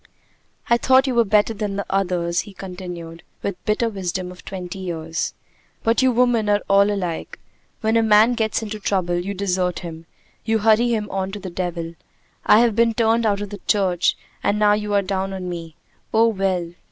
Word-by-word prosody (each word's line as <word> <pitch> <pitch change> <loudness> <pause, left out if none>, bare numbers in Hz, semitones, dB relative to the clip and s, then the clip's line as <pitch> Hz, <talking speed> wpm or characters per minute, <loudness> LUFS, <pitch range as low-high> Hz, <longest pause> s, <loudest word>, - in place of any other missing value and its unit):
"I 235 - +4
thought 260 +2 +4
you 265 - 0
were 235 -1 +4
better 210 +1 +2
than 205 -2 -3
the 200 - -3
others," 180 -3 0
he 205 - -12
continued, 180 -3 -8 0.2
with 200 - -1
the - - -44
bitter 215 +2 +1
wisdom 185 -3 -3
of 180 - -13
twenty 185 -1 -6
years. 165 -3 -3 0.5
"But 225 +3 +2
you 260 0 +4
women 240 -3 +2
are 205 0 +2
all 200 +1 +5
alike. 180 -5 -4 0.4
When 220 +1 +1
a 230 - +5
man 220 +2 +5
gets 225 -1 -1
into 215 0 -5
trouble, 185 -3 0
you 195 +3 -4
desert 180 -2 -1
him. 165 -2 -8 0.4
You 225 0 +1
hurry 220 +2 +3
him 215 -2 -1
on 190 0 -2
to 210 - -5
the 185 -2 -7
devil. 170 -2 -4 0.5
I 215 - +7
have 235 -3 +2
been 230 0 +3
turned 230 0 +2
out 205 -1 0
of 205 -1 -5
the 205 - -8
church, 185 -4 +2 0.2
and 200 +1 +1
now 210 -1 +4
you 210 0 -2
are 200 - +3
down 195 0 -2
on 185 -1 -5
me. 165 -3 -6 0.4
Oh, 225 +1 +4
well! 190 -5 -1
200 Hz, 200 wpm, -22 LUFS, 180-220 Hz, 0.5 s, I